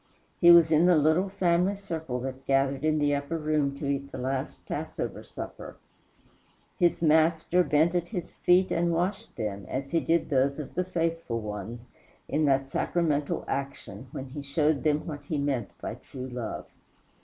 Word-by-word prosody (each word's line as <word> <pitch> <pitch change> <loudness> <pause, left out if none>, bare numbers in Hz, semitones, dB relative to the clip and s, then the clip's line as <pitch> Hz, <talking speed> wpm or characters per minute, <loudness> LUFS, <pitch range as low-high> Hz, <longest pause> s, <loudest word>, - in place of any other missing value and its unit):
He 175 - +7
was 170 -2 +8
in 160 +3 +5
the 180 - +6
little 160 +5 +3
family 185 0 +2
circle 160 -10 -4
that 130 +1 -6
gathered 135 0 +2
in 155 0 +2
the 145 -1 +2
upper 145 +3 -2
room 150 -3 0
to 145 - -5
eat 140 0 -2
the - - -6
last 130 +1 -3
passover - - -4
supper. - - -9 1.0
His 175 -1 +2
Master 160 +3 +4
bent 155 +2 +3
at 175 -1 0
his 180 -5 -5
feet 180 +1 +3
and 170 0 +1
washed 180 +4 -2
them, 100 -3 -4
as 135 +1 -4
he 170 - +3
did 165 -1 0
those 140 0 +2
of 150 -3 -7
the 180 - 0
faithful 165 -8 -2
ones, 105 +2 -6 0.4
in 155 0 +1
that 135 -1 +1
sacramental 150 -4 0
action 140 -1 -5
when 135 - -6
he 145 +2 -6
showed 145 +1 +1
them 150 -1 +1
what 145 -3 -7
he 150 +1 -2
meant 135 -7 -1
by - - -4
true 130 -1 -8
love. 125 -3 -5
150 Hz, 175 wpm, -28 LUFS, 135-170 Hz, 1.0 s, was